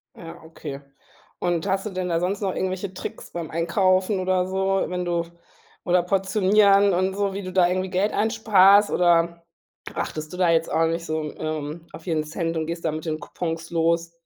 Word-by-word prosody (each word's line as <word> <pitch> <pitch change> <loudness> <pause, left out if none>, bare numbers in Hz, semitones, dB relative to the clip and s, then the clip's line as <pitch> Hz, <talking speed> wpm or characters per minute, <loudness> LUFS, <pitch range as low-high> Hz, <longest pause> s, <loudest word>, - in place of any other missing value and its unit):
Ja, 165 -1 -11
okay. 150 -3 -8 0.6
Und 175 0 -1
hast 195 +1 0
du - - -2
denn 185 -2 -3
da 165 -1 +1
sonst 190 +4 -2
noch 195 -2 -1
irgendwelche 185 +1 -3
Tricks - - -8
beim 170 -2 -5
Einkaufen 185 +4 +1
oder 185 0 +1
so, 190 +1 0
wenn 180 0 -3
du 170 -1 -1 0.6
oder 180 0 +3
portionieren 195 +1 +3
und 185 +2 0
so, 200 -1 -1
wie 200 - -4
du 185 - -6
da 180 -1 +4
irgendwie 185 +1 -1
Geld 190 +3 0
einsparst 205 -2 +5
oder 170 -1 +2 0.5
achtest 155 0 -4
du 180 - -7
da 180 -2 +3
jetzt 165 0 +2
auch 165 +1 +3
nicht 165 +1 -2
so, 155 -1 -2
ähm, 155 +1 -5
auf - - -11
jeden 160 -4 0
Cent 165 +2 -3
und 160 -1 -2
gehst 170 0 -5
da 160 - +1
mit 155 +1 -6
den 155 -1 -2
Coupons 165 +2 -5
los? 165 0 +1
180 Hz, 195 wpm, -24 LUFS, 165-190 Hz, 0.6 s, einsparst